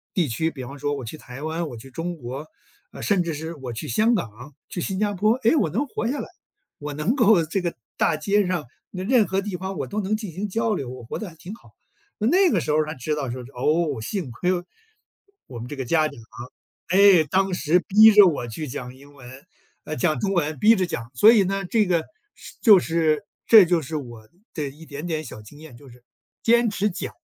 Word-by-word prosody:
地 170 -6 +2
区， 160 +8 -1
比 135 -5 -8
方 140 +2 -10
说 145 +1 -1
我 130 -4 -6
去 115 - -7
台 135 0 -10
湾， 160 +1 -3
我 120 - -8
去 135 +4 -13
中 170 +4 -5
国， 130 +4 -7 0.4
呃， - - -9
甚 200 -4 +2
至 170 -2 -3
是 160 +3 -6
我 130 -5 -7
去 115 - -6
香 220 - +2
港、 125 - -6
去 175 - -5
新 190 +2 -3
加 205 -1 0
坡， 215 +4 +2
诶， 230 - +4
我 205 - +2
能 230 - -1
活 235 -4 -4
下 275 +4 -2
来。 - - -5 0.5
我 145 0 -6
能 175 - 0
够 215 - +4
这 185 +4 -2
个 170 -1 -3 0.2
大 155 - +1
街 200 +4 +1
上， 180 -6 -2 0.2
那 185 -1 -6
任 225 -2 +3
何 190 +2 0
地 195 -2 -4
方 190 +2 -5
我 - - -2
都 210 +1 -3
能 210 +3 -1
进 210 -6 -7
行 195 +5 -4
交 225 +2 0
流， 135 -9 -4
我 125 -1 -9
活 115 - -6
得 215 -5 -6
还 165 - -16
挺 175 +6 -10
好。 230 - -15 0.5
那 215 - -2
那 360 - +4
个 - - +2
时 - - -2
候 155 +1 +3
才 155 +1 -6
知 130 +5 -3
道 140 -4 -3
说， 125 +1 -6
哦， 150 0 0
幸 145 - -4
亏 180 +10 -2 1.0
我 120 -3 -9
们 120 - -7
这 145 - -7
个 135 -2 -5
家 155 +3 +2
长， 145 -3 -11 0.7
诶， 190 -3 +6
当 190 +5 0
时 175 0 +2
逼 215 +2 +8
着 205 -1 +8
我 145 -9 0
去 145 +7 -6
讲 125 -1 -7
英 140 +2 -17
文 135 +2 -13 0.4
呃， 155 - -5
讲 155 -2 0
中 195 -1 -1
文， 155 -4 -1
逼 220 - +5
着 185 -3 0
讲。 120 -6 -6
所 210 - +7
以 215 -4 +5
呢， 195 +1 -2
这 215 +3 +2
个 175 -3 +1 0.3
是 - - -13
就 210 -5 +8
是 160 0 0 0.2
这 220 -3 +9
就 175 -1 +2
是 155 +4 -6
我 120 -6 -9 0.3
的 150 -3 -2
一 150 +4 -14
点 145 +3 -7
点 160 -2 -2
小 120 - -9
经 145 +8 -15
验， 150 -7 -13
就 140 - -16
是 125 0 -17 0.4
坚 235 0 +3
持 210 0 0
讲。 190 +1 -6
165 Hz, 255 characters per minute, -23 LUFS, 140-200 Hz, 1.0 s, 这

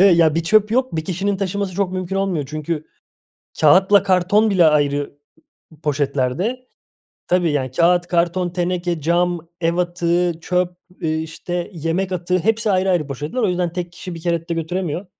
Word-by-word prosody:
ya, 160 -2 +4
bir 165 - 0
çöp 210 +4 +3
yok. 255 -5 +1
Bir 160 -1 -2
kişinin 195 +2 -1
taşıması 195 0 -2
çok 195 -1 0
mümkün 185 0 -3
olmuyor. 190 -7 -1
Çünkü 155 0 -4 0.8
kâğıtla 190 +7 +6
karton 200 +3 +3
bile 185 -4 +4
ayrı 145 -2 +1 0.7
poşetlerde, 150 - -1 0.6
tabii, 175 -2 +2
yani, 130 -3 -1
kâğıt, 175 +5 +3
karton, 175 +1 +1
teneke, 175 -1 -2
cam, 170 +1 0
ev 165 0 +1
atığı, 175 0 +1
çöp, 180 +1 -1 0.2
eee, 160 -2 0
işte, 170 +2 -4
yemek 170 +3 -2
atığı, 180 0 0
hepsi 220 +3 +1
ayrı 190 0 +2
ayrı 175 -6 +1
poşetler. 150 - -4
O 215 - +2
yüzden 180 -1 -1
tek 175 -1 -4
kişi 175 0 -8
bir 165 - -9
kere 170 0 -2
de - - 0
götüremiyor. 170 +2 -3
175 Hz, 160 wpm, -20 LUFS, 165-185 Hz, 0.8 s, kâğıtla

